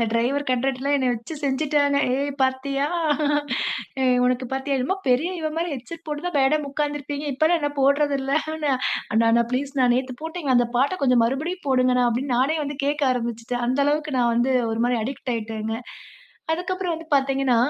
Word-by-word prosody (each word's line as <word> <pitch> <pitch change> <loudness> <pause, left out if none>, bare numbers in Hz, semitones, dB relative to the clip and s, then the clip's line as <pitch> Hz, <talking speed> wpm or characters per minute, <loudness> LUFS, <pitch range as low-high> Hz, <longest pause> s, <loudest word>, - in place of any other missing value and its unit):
அந்த 230 - +3
டிரைவர் 260 +5 +1
கண்ட்ரக்டர்லாம் 265 +2 +1
என்ன 260 -2 0
வச்சு 235 +8 -7
செஞ்சுட்டாங்க. 285 +1 +2 0.2
"ஏய், 285 +1 -1
பாத்தியா? 275 +2 0 1.2
ஏய் 250 -1 +3
உனக்கு 255 0 0
பாத்தியா? 270 +1 -1
என்னமோ 265 +10 0
பெரிய 265 +8 +2
இவ 310 -1 -2
மாதிரி 335 0 -1
ஹெட்செட் 320 +7 -9
போட்டுதான் 300 +3 -3
மேடம் 290 +2 +2
உக்காந்துருப்பீங்க. 290 0 -3
இப்போலாம் 320 +4 +2
என்ன 290 -1 0
போடுறதில்லன்ன" 280 +2 +1
"அண்ணா, 300 -3 0 0.6
அண்ணா, 235 0 +4
ப்ளீஸ், 275 +2 -2
ணா, 255 - +5
நேத்து 255 0 -2
போட்டீங்க, 320 -3 -4
அந்த 245 - +3
பாட்ட 280 +8 +2
கொஞ்சம் 250 -3 +4
மறுபடியும் 315 +9 -3
போடுங்கண்ணா" 255 -1 +3
அப்படின்னு 250 +2 -1
நானே 290 +5 +2
வந்து 285 0 -5
கேக்க 295 +1 -1
ஆரம்பிச்சுட்டேன். 240 0 -3
அந்த 260 +2 0
அளவுக்கு 300 -1 0
நான் 240 -1 +3
வந்து 240 +3 +2 0.2
ஒரு 225 - -2
மாரி 245 -1 +1
அடிக்ட் 260 0 -4
ஆயிட்டேங்க. 220 0 -4 0.8
அதுக்கு 360 +3 -2
அப்புறம் 370 -2 -2
வந்து 325 0 -9
பாத்தீங்கன்னா, 270 -2 +2
275 Hz, 170 wpm, -23 LUFS, 250-295 Hz, 1.2 s, ணா